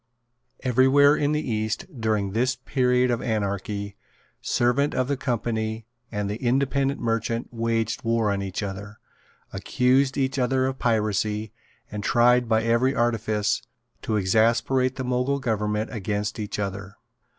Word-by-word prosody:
Every 130 0 +3
where 145 +2 +6
in 145 -1 0
the 150 0 -1
East, 110 -1 -2 0.2
during 105 -3 0
this 125 +5 +1
period 125 -1 +1
of 120 - -1
anarchy, 100 -2 -3 0.4
servant 125 +4 +1
of 130 - +1
the 140 - 0
Company 115 -3 -2 0.3
and 105 -2 -2
the 105 +2 -3
independent 135 +2 +1
merchant 115 0 -1
waged 115 -1 -1
war 115 -2 +1
on 100 0 -1
each 95 +1 -4
other, 100 +2 -6 0.6
accused 130 +7 +1
each 135 0 0
other 130 +1 +1
of 130 0 -3
piracy, 105 -1 0 0.4
and 105 -1 -5
tried 120 +1 +3
by 110 0 +3
every 115 +4 +2
artifice 110 -3 0 0.4
to 110 - -2
exasperate 115 +6 +2
the 135 - -4
Mogul 125 +2 0
government 105 -3 -1
against 105 0 -3
each 105 -1 -4
other. 100 -1 -4
115 Hz, 140 wpm, -25 LUFS, 105-130 Hz, 0.6 s, where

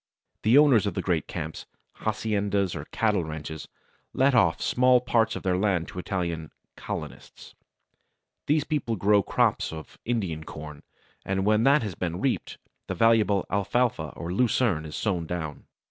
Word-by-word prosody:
The 115 +5 +5
owners 135 -8 +5
of 100 - -3
the - - -1
great 85 -5 0
camps, - - -6 0.3
haciendas 100 -3 0
or 75 -1 -6
cattle 105 -2 0
ranches 80 -1 -7 0.5
let 135 +1 +3
off 100 -9 +3
small 125 0 +4
parts 115 -2 +1
of - - -6
their 95 -2 +1
land 95 -5 +1
to 90 - -7
Italian 85 -4 -3 0.3
"colonists." - - -8 0.9
These 150 0 +3
people 140 -7 -1
grow 100 +1 +3
crops - - +1
of 80 -1 -10
Indian 95 -10 -2
corn, 75 -1 -9 0.4
and 95 0 -1
when 105 +2 +3
that 140 0 +5
has 105 -4 -3
been 85 0 -3
reaped, 135 +2 -1 0.3
the - - -3
valuable 110 -4 +3
Alfalfa 100 -4 0
or 85 +1 -5
Lucerne 105 -7 +1
is 75 - -8
sown 90 -6 -1
down. 80 -4 -5
100 Hz, 155 wpm, -26 LUFS, 85-115 Hz, 0.9 s, The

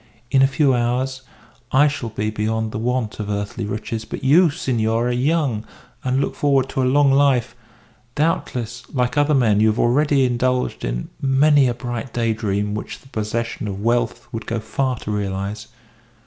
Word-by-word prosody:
In 135 - +4
a 135 - +6
few 140 0 +2
hours 125 +2 -1 0.5
I 145 +3 +5
shall 140 -5 -3
be 110 0 -2
beyond 110 +1 -1
the 110 - -4
want 120 -2 -2
of 105 -1 -4
earthly 100 +2 -3
riches, 110 +2 -4
but 110 - -7
you, 160 +6 +5
senor, 120 -6 0
are - - 0
young, 130 -3 0 0.4
and 130 +1 +1
look 140 - -1
forward 135 -2 +1
to 130 - -1
a 125 - +2
long 145 0 +4
life; 135 -4 +3 0.6
doubtless, 120 -7 -1
like 125 -2 0
other 145 0 +3
men, 110 -6 +3
you 110 - +4
have 110 +1 +1
already 135 +3 +3
indulged 125 +1 0
in - - -3
many 140 +1 +4
a 120 - -1
bright 120 -1 -5
day 115 -2 +1
dream 105 -1 -2
which 105 - -6
the 135 - -19
possession 110 0 -3
of 100 -1 -5
wealth 120 0 0
would 115 -2 -6
go 115 0 -1
far 125 +4 -1
to 105 - -5
realise. 100 +1 -3
120 Hz, 180 wpm, -21 LUFS, 110-135 Hz, 0.6 s, a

